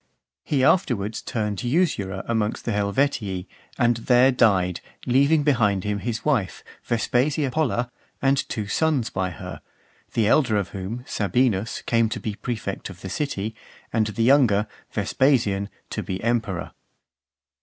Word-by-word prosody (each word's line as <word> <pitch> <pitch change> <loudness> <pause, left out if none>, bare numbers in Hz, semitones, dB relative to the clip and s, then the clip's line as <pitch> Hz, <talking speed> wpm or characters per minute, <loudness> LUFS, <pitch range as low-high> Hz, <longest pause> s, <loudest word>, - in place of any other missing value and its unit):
He 135 -3 +1
afterwards 115 - +2
turned 105 -3 -3
usurer 120 - 0
amongst 110 -2 -1
the 115 - 0
Helvetii, 100 -2 0 0.3
and 120 -2 +3
there 125 +3 +4
died, 95 -8 +2 0.2
leaving 140 +5 +4
behind 105 -10 +2
him 105 -1 -1
his 115 0 -4
wife, 120 - 0 0.2
Vespasia 130 +4 +1
Pella, 125 -4 0 0.3
and 135 0 +1
two 110 -4 -3
sons 140 +3 0
by 95 -1 -1
her; 85 - -8 0.5
the 115 - +2
elder 115 -1 +3
of 100 - -1
whom, 100 +5 -5
Sabinus, 110 +1 0
came 115 -1 +2
to - - -3
be 110 - -3
prefect 110 -3 -4
of 95 0 -11
the 95 - -6
city, 110 -7 -2 0.4
and 110 -2 +2
the 105 +2 -1
younger, 120 -6 +4 0.2
Vespasian, 110 -8 +1 0.2
to - - -2
be 95 - -4
emperor. 110 -7 -1
115 Hz, 140 wpm, -24 LUFS, 100-130 Hz, 0.5 s, there